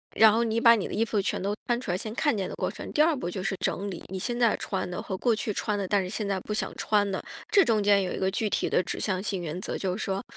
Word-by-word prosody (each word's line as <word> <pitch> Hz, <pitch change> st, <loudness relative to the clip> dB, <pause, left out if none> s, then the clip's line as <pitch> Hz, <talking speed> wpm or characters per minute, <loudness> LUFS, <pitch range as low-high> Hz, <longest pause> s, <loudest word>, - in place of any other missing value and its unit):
然 220 Hz, -1 st, +8 dB
后 230 Hz, +2 st, +2 dB
你 225 Hz, 0 st, 0 dB
把 230 Hz, 0 st, +8 dB
你 210 Hz, -, -2 dB
的 -, -, -7 dB
衣 225 Hz, -, +2 dB
服 210 Hz, -2 st, 0 dB
全 -, -, -1 dB
都 200 Hz, +2 st, -1 dB
翻 240 Hz, -1 st, +1 dB
出 240 Hz, -, -3 dB
来 175 Hz, -, 0 dB
先 215 Hz, +3 st, -5 dB
看 290 Hz, -5 st, +2 dB
见 190 Hz, -2 st, -2 dB
的 -, -, -6 dB
过 -, -, -2 dB
程。 -, -, -8 dB
第 300 Hz, -, +3 dB
二 320 Hz, +1 st, +4 dB
步 215 Hz, -10 st, -3 dB
就 185 Hz, +1 st, -4 dB
是 195 Hz, -, -1 dB
整 200 Hz, +2 st, -1 dB
理 175 Hz, -, -7 dB
你 190 Hz, -, -5 dB
现 240 Hz, +6 st, -2 dB
在 235 Hz, -3 st, +3 dB
穿 190 Hz, -2 st, -3 dB
的 180 Hz, -, -4 dB
和 190 Hz, -, -4 dB
过 235 Hz, +1 st, +2 dB
去 210 Hz, 0 st, -2 dB
穿 210 Hz, 0 st, -1 dB
的 195 Hz, -2 st, -2 dB
但 200 Hz, +1 st, +2 dB
是 180 Hz, -, -5 dB
现 210 Hz, +1 st, -3 dB
在 195 Hz, -1 st, 0 dB
不 210 Hz, -, -5 dB
想 -, -, -2 dB
穿 205 Hz, -1 st, +1 dB
了。 190 Hz, -, -2 dB, 0.3 s
这 395 Hz, -, +6 dB
中 220 Hz, -3 st, +2 dB
间 200 Hz, -1 st, +5 dB
有 180 Hz, -, -3 dB
一 -, -, -4 dB
个 190 Hz, 0 st, +1 dB
具 210 Hz, +1 st, -1 dB
体 -, -, 0 dB
的 -, -, +3 dB
指 -, -, -4 dB
向 185 Hz, -3 st, -1 dB
性 195 Hz, -2 st, -2 dB
原 170 Hz, +1 st, -4 dB
则， -, -, -3 dB
就 185 Hz, -1 st, -2 dB
是 215 Hz, -, -3 dB
说， 195 Hz, 0 st, -2 dB
205 Hz, 355 characters per minute, -27 LUFS, 190-225 Hz, 0.3 s, 然